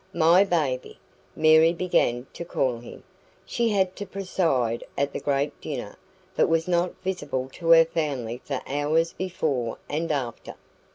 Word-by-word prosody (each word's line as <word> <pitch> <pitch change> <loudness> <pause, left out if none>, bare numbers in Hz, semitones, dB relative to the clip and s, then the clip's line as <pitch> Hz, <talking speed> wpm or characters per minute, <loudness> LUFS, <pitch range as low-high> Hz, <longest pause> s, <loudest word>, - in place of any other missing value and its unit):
"MY 170 +4 +5
baby," 150 -9 -1 0.4
Mary 160 +1 +5
began 135 -9 +1
to - - -6
call 130 -7 -1
him. 120 - -12 0.4
She 235 -1 0
had 190 -3 +1
to 205 - -5
preside 165 -12 -1
at 140 0 0
the - - -3
great 140 +1 -1
dinner, 125 -8 -5 0.4
but - - +3
was 165 0 +1
not 175 0 0
visible 145 -9 -3
to 165 -1 -4
her 165 0 +8
family 135 -8 -3
for 135 -3 -3
hours 150 +4 0
before 150 -11 -2
and 160 +2 -2
after. 130 -5 -4
155 Hz, 150 wpm, -25 LUFS, 135-175 Hz, 0.4 s, her